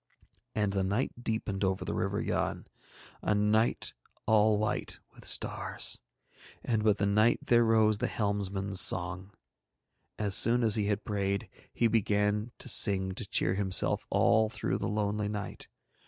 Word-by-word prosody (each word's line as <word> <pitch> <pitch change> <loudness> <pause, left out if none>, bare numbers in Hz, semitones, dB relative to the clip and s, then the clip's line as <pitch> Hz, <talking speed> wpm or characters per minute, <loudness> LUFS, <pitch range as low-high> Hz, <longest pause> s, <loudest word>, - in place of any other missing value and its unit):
And 105 -2 0
the 95 -1 0
night 120 +5 -3
deepened 110 -3 -3
over 95 -1 -1
the - - -3
River - - -2
Yann, - - -2 0.6
a 105 - 0
night 105 +2 +1 0.3
all 110 -1 +3
white 110 +1 -3
with - - -13
stars. - - 0 0.6
And 110 -3 -1
with 105 -2 +2
the 100 - 0
night 105 +4 +3
there 120 -1 +4
rose 110 -2 +2
the - - 0
helmsman's 100 -2 0
song. 90 +2 +2 0.9
As 105 -2 -2
soon 120 +4 +4
as 110 -2 +2
he 105 -2 0
had 105 0 -2
prayed 100 -1 -2 0.2
he 120 - -1
began 105 0 0
to - - -8
sing 95 -3 +5
to 100 +2 -7
cheer 90 - +1
himself 95 -1 +1
all 110 -2 +3
through - - -3
the - - -3
lonely 105 0 -2
night. 105 -1 -6
105 Hz, 155 wpm, -29 LUFS, 100-110 Hz, 0.9 s, sing